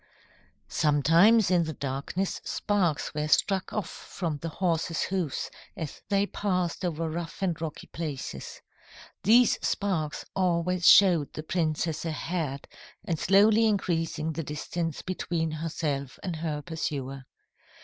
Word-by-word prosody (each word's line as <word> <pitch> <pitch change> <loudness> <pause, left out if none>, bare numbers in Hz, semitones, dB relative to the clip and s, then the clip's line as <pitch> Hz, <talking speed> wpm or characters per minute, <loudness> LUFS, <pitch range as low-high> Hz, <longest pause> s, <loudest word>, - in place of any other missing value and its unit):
"Sometimes 165 +8 +4
in 175 -2 +3
the 160 - -4
darkness 140 +8 -3
sparks 185 -8 0
were 150 0 -1
struck 190 +5 +2
off 210 -5 -2
from 165 -5 -5
the 165 +3 -5
horses' 165 -1 0
hoofs 180 -7 -2 0.3
as 160 -4 -6
they 200 0 +3
passed 185 -4 -1
over 165 -2 -1
rough 165 +3 -5
and 170 -4 -1
rocky 160 -2 -5
places. 145 - -6 0.6
These 235 +4 +5
sparks 170 -7 -1
always 180 -1 +1
showed 175 -7 +6
the 155 - -6
princess 160 -1 -1
ahead 160 -3 -3 0.4
and 165 -3 -1
slowly 210 +4 +5
increasing 165 -6 0
the 165 - -3
distance 155 +2 -4
between 170 -3 -2
herself 150 -4 -3
and 175 -4 -3
her 155 -2 -3
pursuer. 140 -5 -4
165 Hz, 125 wpm, -28 LUFS, 155-185 Hz, 0.6 s, showed